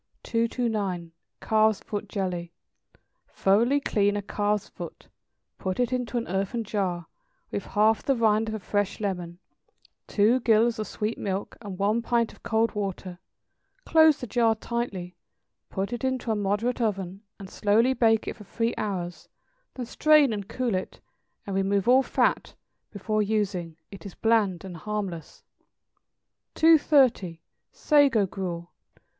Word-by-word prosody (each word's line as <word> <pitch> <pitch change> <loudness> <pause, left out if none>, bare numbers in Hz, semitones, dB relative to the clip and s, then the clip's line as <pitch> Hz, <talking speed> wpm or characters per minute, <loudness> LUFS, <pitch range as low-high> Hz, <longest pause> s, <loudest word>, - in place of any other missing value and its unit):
229. 220 -7 -1 0.3
=Calf's 220 -1 +3
Foot 210 -1 -5
Jelly.= 180 -4 -3 0.8
Thoroughly 230 +9 +2
clean 205 -6 +1
a 205 - -3
calf's 205 0 -1
foot; - - -10 0.5
put 185 +2 -3
it 245 +1 +1
into 250 -1 -2
an 235 - -2
earthen 195 +5 -2
jar, 190 -5 -2 0.5
with - - -4
half 215 +1 +3
the 275 - +1
rind 220 -1 +2
of 220 - -3
a - - -4
fresh 205 0 -1
lemon, 180 -4 -3 0.7
two 220 +5 +3
gills 230 0 +3
of 215 - -3
sweet 215 +2 -3
milk, 195 0 -3
and 200 -4 -7
one 210 +4 +1
pint 235 -1 0
of - - -20
cold 225 0 +1
water; 190 -3 -4 0.7
close 315 -2 +5
the - - -5
jar 230 -2 +2
tightly, 205 -6 -4 0.5
put 195 +4 -3
it 240 - -5
into 260 -3 -1
a - - +1
moderate 210 +5 -1
oven, 195 -3 -2 0.2
and 195 -1 -10
slowly 225 +5 +3
bake 225 -3 +2
it - - -3
for 210 - -12
three 230 +4 -2
hours; 180 -4 -4 0.5
then 250 - -4
strain 300 0 +4
and 200 -2 -5
cool 250 -4 -1
it, 185 0 -4 0.5
and 195 - -4
remove 195 +1 +1
all 255 +2 +6
fat, - - 0 0.3
before 215 +1 -1
using; 195 -6 -1
it 195 - -11
is 200 - -9
bland 210 -6 +1
and 180 -3 -8
harmless. 195 -4 -5 1.1
230. 275 - +4 0.3
=Sago 280 -9 +3
Gruel. 175 -3 -5
210 Hz, 145 wpm, -26 LUFS, 195-235 Hz, 1.1 s, all